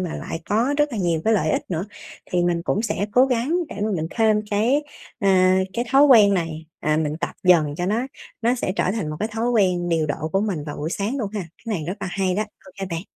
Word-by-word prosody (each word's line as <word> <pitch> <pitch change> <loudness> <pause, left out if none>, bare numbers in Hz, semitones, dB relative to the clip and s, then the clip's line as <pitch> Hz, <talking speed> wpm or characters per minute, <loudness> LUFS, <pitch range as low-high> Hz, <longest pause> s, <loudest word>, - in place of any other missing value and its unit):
mà 175 -3 -3
lại 165 - -5
có 235 +7 +1
rất 295 -2 +1
là 220 - -3
nhiều 170 -3 +1
cái 220 0 +3
lợi 160 -6 +1
ích - - 0
nữa 170 +1 -1 0.5
thì 175 -1 +1
mình 170 -1 0
cũng 205 - 0
sẽ 210 -2 -1
cố 255 +2 +5
gắng 260 +6 0
để - - -8
mà 215 - 0
mình 160 0 -2
thêm 215 -2 +2
cái, 230 +8 +2 0.4
à, 185 -1 +4
cái 240 +1 -1
thói 275 +2 +6
quen 215 -8 +7
này, 160 -2 -3
à, 155 0 +1
mình 155 -1 -1
tập 170 - -3
dần 160 -5 +4
cho 175 +2 -2
nó 230 +6 0 0.4
nó 240 +2 +3
sẽ 190 -6 -2
trở 170 - +1
thành 200 -9 -3
một 155 - -5
cái 215 - -1
thói 225 +2 -1
quen 185 -6 +2
điều 160 -2 +1
độ 150 +2 -3
của 195 - +2
mình 190 -9 -2
vào 150 - -6
buổi 155 +3 -3
sáng 205 +8 -2
luôn 210 -5 -3
ha. 205 - -1
Cái 190 +6 -6
này 155 - -5
rất 180 - -2
là - - -3
hay 190 -1 0
đó, 210 - +1
ô 210 -2 -14
kê 195 - -2
bạn. 165 +1 -3
195 Hz, 265 wpm, -22 LUFS, 170-225 Hz, 0.5 s, quen